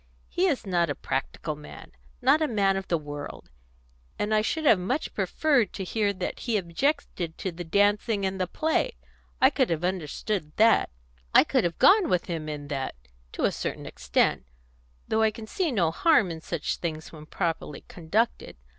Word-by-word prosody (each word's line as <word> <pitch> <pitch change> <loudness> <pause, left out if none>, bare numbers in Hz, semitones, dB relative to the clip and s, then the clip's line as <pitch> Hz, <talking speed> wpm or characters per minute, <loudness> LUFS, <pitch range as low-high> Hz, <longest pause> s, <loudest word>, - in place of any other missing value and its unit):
He 370 +2 +1
is 280 -9 -1
not 175 -4 +1
a 145 - -1
practical 150 +3 -3
man 150 0 -12 0.3
not 310 - +5
a 310 - +2
man 200 -5 +2
of 195 0 -4
the 170 - +1
world; 145 - -8 0.7
and 210 +1 -1
I 215 - +4
should 315 +8 -2
have 220 -9 +6
much 190 - -2
preferred 280 -8 +1
to 195 - -4
hear 205 +2 0
that 185 -2 -4
he 230 -3 0
objected 180 - -2
to 190 - -3
the 175 +1 -7
dancing 205 +3 +2
and 190 0 -2
the 185 - 0
play; 320 - 0 0.5
I 265 - +6
could 265 -3 +1
have 165 0 -1
understood 180 -1 -2
that; 225 +1 +5 0.5
I - - +9
could - - +1
have 170 -1 -2
gone 385 -3 +6
with 180 -1 +1
him 160 -3 -4
in 145 -1 -6
that 135 -3 -3 0.4
to - - -3
a - - +3
certain - - -4
extent, 60 0 0 0.6
though 220 0 +1
I 220 - +5
can 220 +1 -9
see 335 - -1
no 175 -9 +2
harm 215 - +3
in 160 -1 -7
such 165 -1 -3
things 160 -2 -5
when 155 -1 -12
properly 165 -5 -3
conducted. 205 +8 -1
190 Hz, 185 wpm, -27 LUFS, 165-225 Hz, 0.7 s, I